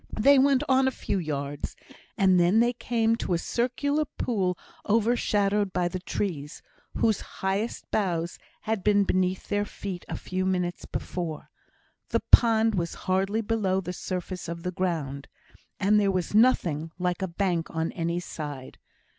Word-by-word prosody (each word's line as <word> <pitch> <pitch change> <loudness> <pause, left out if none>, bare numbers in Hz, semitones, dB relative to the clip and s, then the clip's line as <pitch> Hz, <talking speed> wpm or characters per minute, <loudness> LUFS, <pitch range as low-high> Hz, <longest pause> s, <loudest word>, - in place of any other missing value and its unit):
They 275 +5 +6
went 275 0 +4
on 265 0 +4
a 265 - -2
few 195 - -1
yards, 145 -3 -4 0.4
and 190 -3 +4
then 175 +5 +4
they 240 +1 +3
came 230 -1 +1
to 180 - -1
a - - +2
circular 255 - 0
pool 190 -10 -1 0.3
overshadowed 210 -3 +2
by 175 -1 +1
the 185 +1 -4
trees, 165 -5 -4 0.3
whose 220 -3 +2
highest 195 +4 -3
boughs 175 -4 -1 0.2
had 220 -3 -2
been 205 -1 +4
beneath 185 -1 0
their 205 0 +1
feet 195 -3 -6
a - - -3
few 185 0 -3
minutes 180 -2 -1
before. 170 -4 -5 0.6
The - - 0
pond 225 -1 +6
was 170 -3 -2
hardly 195 +4 +1
below 205 -4 0
the 180 -1 -5
surface 180 0 -5
of 170 0 -6
the 180 - -2
ground, 155 -7 -2 0.5
and 210 +2 +4
there 200 -1 +2
was 185 -1 -1
nothing 175 - +3
like 180 +1 -1
a 190 - 0
bank 175 -2 -1
on 160 0 -2
any 170 0 -2
side. 145 -6 -7
190 Hz, 155 wpm, -27 LUFS, 175-220 Hz, 0.6 s, They